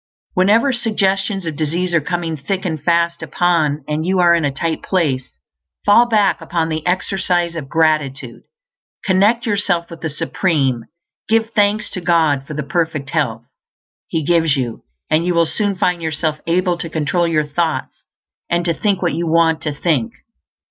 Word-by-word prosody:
Whenever 220 +9 +3
suggestions 195 -4 0
of 160 -2 -3
disease 170 +4 -1
are 170 - +3
coming 170 +1 -2
thick 190 +7 -3
and 160 -5 -2
fast 170 0 +1
upon 165 -1 +1
you, 150 - -14
and 150 +1 -1
you 185 +3 0
are 175 -1 +5
in 170 -1 +2
a 145 - +2
"tight 160 +4 -2
place," 135 - -1 0.5
fall 230 +4 +6
back 210 -4 +2
upon 165 -2 -1
the 155 -1 -3
exercise 180 -1 0
of 145 -5 -6
gratitude. 150 -6 0 0.6
Connect 205 +6 +3
yourself 195 -6 0
with 165 - -10
the 160 - -2
Supreme; 140 - 0 0.4
give 225 0 +2
thanks 210 0 +2
to 185 - -5
God 160 -5 +2
for 155 - -6
the 150 - -2
perfect 160 -3 -2
health - - -1 0.6
He 160 - -2
gives 165 -3 +2
you, 120 -4 -3 0.3
and 155 +2 +3
you 180 0 0
will 170 0 +4
soon 200 +4 -1
find 180 -2 0
yourself 155 -1 -2
able 175 +1 +1
to 165 - -4
control 160 +3 0
your 155 -2 +1
thoughts, 160 +2 -2 0.5
and 170 0 0
to 170 - +2
think 195 +1 0
what 175 - +1
you 170 +2 -2
want 165 0 +3
to 150 - -2
think. 170 +10 -1
170 Hz, 175 wpm, -18 LUFS, 155-185 Hz, 0.6 s, fall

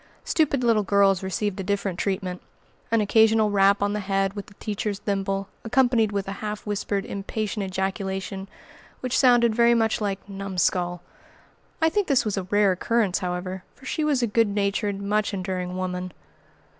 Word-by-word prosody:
Stupid 285 -5 +1
little 230 -3 +4
girls 200 -2 +3
received 190 +1 -2
a - - -2
different 200 -2 -2
treatment, 185 -2 -2 0.5
an 230 -1 +3
occasional 220 0 +4
rap 200 0 +4
on 205 0 +1
the 210 - -1
head 195 -1 0
with 205 -1 -7
the 205 - -17
teacher's 210 -1 -3
thimble; 195 -1 -2 0.2
accompanied 235 -2 +2
with 200 -1 -2
a - - -3
half 210 -1 -4
whispered, 205 -1 -2
impatient 205 +1 -3
ejaculation, 190 0 -3 0.5
which 255 -1 -1
sounded 240 -3 +5
very 235 +1 +4
much 225 -1 +1
like 200 -2 -3
"Numskull!" 185 -3 -1 0.8
I 320 - +5
think 410 +3 0
this 275 -6 +3
was 210 - -1
a 195 - -1
rare 205 +1 +3
occurrence, 200 +1 +1
however, 185 0 -4
for 265 - -17
she 310 - -1
was 285 -5 +1
a - - +4
good 225 0 +2
natured, 200 0 -1
much 205 +1 0
enduring 185 -1 -3
woman. 180 -1 -3
200 Hz, 170 wpm, -25 LUFS, 190-220 Hz, 0.8 s, sounded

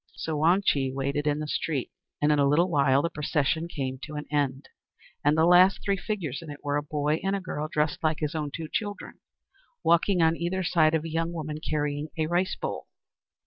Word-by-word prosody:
So 160 - -3
Wang 170 +6 +3
Chih 135 -2 +2
waited 140 +2 -2
in 145 0 +2
the 155 0 -4
street; 150 -3 -2 0.3
and 150 +1 +3
in 150 - +3
a 140 - +4
little 170 +6 +3
while 140 -2 +3
the 170 - -1
procession 155 +1 0
came 130 -5 -4
to 150 +2 -8
an 150 - -4
end; 140 -2 -1 0.6
and 150 +2 +3
the 160 - +5
last 180 +2 +6
three 200 - +2
figures 180 - -4
in 165 - -10
it 145 0 -9
were 145 0 -1
a - - 0
boy 150 +1 -1
and 195 +1 0
girl, 155 -4 -3
dressed 150 -1 0
like 155 -1 +2
his 150 0 -2
own 150 -2 -2
two 160 +1 -5
children, 205 +4 -4 0.6
walking 170 +3 +3
on 160 0 +4
either 175 +3 -2
side 160 -2 +3
of 155 - 0
a 165 - -6
young 165 +1 -1
woman 155 -2 -4
carrying 150 -1 -2
a 160 - +1
rice 175 +3 0
bowl. - - -5
155 Hz, 215 wpm, -27 LUFS, 145-170 Hz, 0.6 s, last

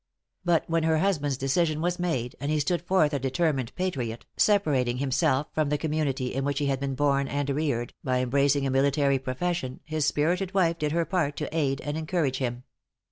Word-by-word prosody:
But 175 -2 +2
when 165 0 +1
her 160 0 +2
husband's 150 -7 0
decision 155 +4 +1
was 175 +2 -1
made, 130 -9 -2
and 140 +3 -3
he 155 0 +1
stood 170 +4 0
forth 175 -4 +2
a 140 - 0
determined 135 -1 0
patriot, 130 -11 -3
separating 140 - +2
himself 135 +1 +1
from 155 -2 +1
the 150 - +1
community 145 -4 -1
in 135 - -1
which 140 0 -1
he 145 - 0
had 135 -1 0
been 135 -1 -2
born 140 0 +2
and 145 +1 -2
reared, 140 -5 -1
by 130 -1 +1
embracing 140 +2 +2
a 135 - 0
military 140 0 +2
profession, 130 +1 -3
his 155 -1 -1
spirited 180 +7 0
wife 170 -3 +2
did 150 -1 0
her 165 +1 +1
part 160 -7 0
to - - -4
aid 140 -3 0
and 150 +2 -3
encourage 155 -5 0
him. 125 -1 -3
145 Hz, 195 wpm, -27 LUFS, 135-165 Hz, -, But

